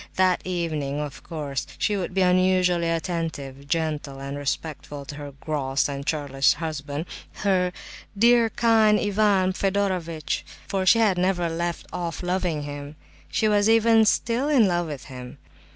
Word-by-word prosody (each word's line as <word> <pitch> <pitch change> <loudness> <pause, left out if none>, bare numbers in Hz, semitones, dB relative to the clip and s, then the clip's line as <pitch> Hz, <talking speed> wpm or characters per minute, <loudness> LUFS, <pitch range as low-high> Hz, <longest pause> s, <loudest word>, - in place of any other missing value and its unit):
That 185 -1 +3
evening, 155 -6 -2
of 150 -2 -5
course, 145 -5 -4
she 210 - +1
would 185 -1 -4
be 190 - +2
unusually 180 -1 +3
attentive, 160 -5 -3
gentle, 150 -3 -2
and 140 +1 -5
respectful 145 0 -4
to 145 - -7
her 145 -1 -8
"gross 140 -3 -1
and 140 -1 -5
churlish" 140 -3 +2
husband, 150 -1 -4 0.4
her 180 -2 +2 0.5
"dear, 235 +1 +5
kind 220 -2 +4
Ivan 200 -2 +2
Fedorovitch," 185 -6 -1 0.2
for 190 -1 -1
she 230 - +7
had 210 -5 +3
never 180 -2 +1
left 170 +1 -3
off 170 0 -4
loving 180 -4 -1
him. 145 +1 -7 0.3
She 220 - +1
was 210 0 +3
even 225 0 +5
still 235 +5 +1
"in 255 -8 +5
love" 175 -2 0
with 145 -5 -6
him. 125 -2 -9
170 Hz, 150 wpm, -24 LUFS, 145-195 Hz, 0.5 s, she